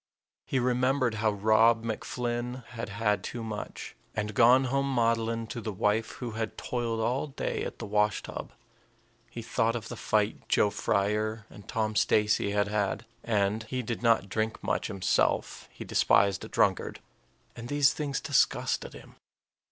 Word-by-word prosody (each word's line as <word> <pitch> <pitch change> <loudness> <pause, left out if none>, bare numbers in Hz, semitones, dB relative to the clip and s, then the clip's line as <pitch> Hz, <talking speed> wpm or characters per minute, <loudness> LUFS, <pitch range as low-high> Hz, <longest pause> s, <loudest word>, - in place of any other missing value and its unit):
He - - 0
remembered 125 0 +2
how 110 - +3
Rob 110 +2 +4
MacFlynn 120 +2 -3
had 115 -2 -6
had 105 -1 0
too 120 -2 -5
much, 110 -2 -6 0.2
and 105 0 -2
gone 125 +5 +6
home 135 +1 0
maudlin 115 -2 +1
to 120 - -5
the 110 - -3
wife 105 +2 0
who 125 -2 -6
had 110 0 -4
toiled 115 -2 -2
all 125 +6 0
day 135 - -3
at - - -5
the - - -6
wash 105 0 +1
tub. - - -7 0.8
He 115 0 -7
thought 115 0 0
of 115 - -5
the - - -5
fight 105 0 -1
Joe 105 - +3
Frier 105 +3 0
and 100 -1 -13
Tom 110 -1 -1
Stacey 105 0 +2
had 100 0 +1
had. 105 +2 -1 0.2
And 105 -1 +1
he 125 +2 -3
did 115 0 -4
not 115 -4 +3
drink 110 +3 -2
much - - -1
himself; 95 -2 0
he - - -9
despised 100 -1 +3
a - - -6
drunkard - - +1 0.6
and 115 0 -7
these 145 +1 +3
things 145 -2 -2
disgusted - - +1
him. - - -14
115 Hz, 160 wpm, -29 LUFS, 105-120 Hz, 0.8 s, gone